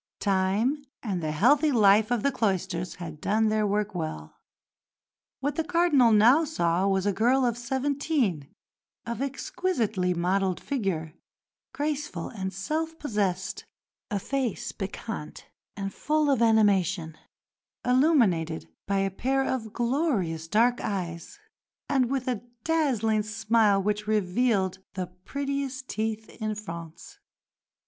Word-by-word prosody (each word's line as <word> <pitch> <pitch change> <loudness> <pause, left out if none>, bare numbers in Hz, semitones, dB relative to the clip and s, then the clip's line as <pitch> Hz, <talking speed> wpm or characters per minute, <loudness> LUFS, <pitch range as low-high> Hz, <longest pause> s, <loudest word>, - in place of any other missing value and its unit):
Time 205 +9 +1 0.2
and 195 -7 -2
the 155 -1 -2
healthy 280 - +4
life 215 -2 +5
of 245 -3 0
the 280 - +3
cloisters 190 -7 -1
had 160 -4 -8
done 220 +1 +2
their 215 -1 +1
work 210 +1 0
well. 155 - -5 1.1
What 285 +4 -1
the 325 - +1
Cardinal 325 -8 +4
now 235 +9 +6
saw 180 - +1
was 190 -1 +1
a 205 - +2
girl 250 +6 +3
of 240 -2 +1
seventeen, 260 - -1 0.6
of 235 +1 -4
exquisitely 250 - -1
modelled 185 +1 +1
figure, 190 - -2 0.6
graceful 290 - -3
and 190 -4 -4
self 315 - -3
possessed; 195 - -2 0.4
a 210 - -1
face 255 +2 -2
piquant 195 -3 -6 0.3
and 195 -1 -4
full 300 0 +1
of 260 -4 +2
animation, 195 -7 +3 0.7
illuminated 235 - +2 0.2
by 200 0 +1
a 195 0 0
pair 270 +7 0
of 225 -5 -2
glorious 235 - 0
dark 235 +6 +3
eyes, 180 - -4 0.5
and 260 -4 +2
with 265 -2 -2
a 245 -5 -1 0.2
dazzling 245 -10 +1
smile 215 -1 +2
which 210 +1 -1
revealed 205 -1 +1 0.2
the 185 -1 -2 0.2
prettiest 275 0 -3
teeth 220 0 -2
in 215 0 -1
France. 170 -6 -9
215 Hz, 125 wpm, -27 LUFS, 190-265 Hz, 1.1 s, now